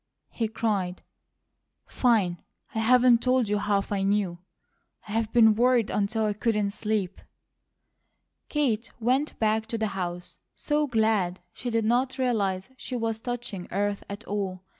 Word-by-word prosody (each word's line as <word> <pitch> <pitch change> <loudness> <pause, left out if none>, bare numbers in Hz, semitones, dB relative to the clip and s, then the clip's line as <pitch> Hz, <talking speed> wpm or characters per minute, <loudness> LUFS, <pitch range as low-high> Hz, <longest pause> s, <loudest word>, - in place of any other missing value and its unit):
he 225 - -1
cried. 200 -5 -2 0.8
"Fine! 200 -9 +1 0.3
I 225 - -1
haven't 245 +1 +5
told 255 -2 +2
you 205 0 +1
HALF 200 -1 0
I 200 -1 0
knew. 195 -3 0 0.7
I've 220 +1 -1
been 225 -2 +6
worried 240 0 +3
until 215 +2 0
I 210 - +1
couldn't 210 -1 0
sleep." 210 -3 -2 1.3
Kate 245 -7 0
went 255 +6 0
back 220 0 +1
to 230 - -3
the 220 -1 -1
house 175 -2 -5 0.2
so 295 0 0
glad 220 -6 +1
she 245 - -5
did 230 -2 0
not 250 +4 +1
realize 210 -5 0
she 255 - -5
was 225 -2 -1
touching 235 -6 -5
earth 200 +1 -1
at 200 +2 -6
all. 195 -3 -3
220 Hz, 140 wpm, -27 LUFS, 200-240 Hz, 1.3 s, been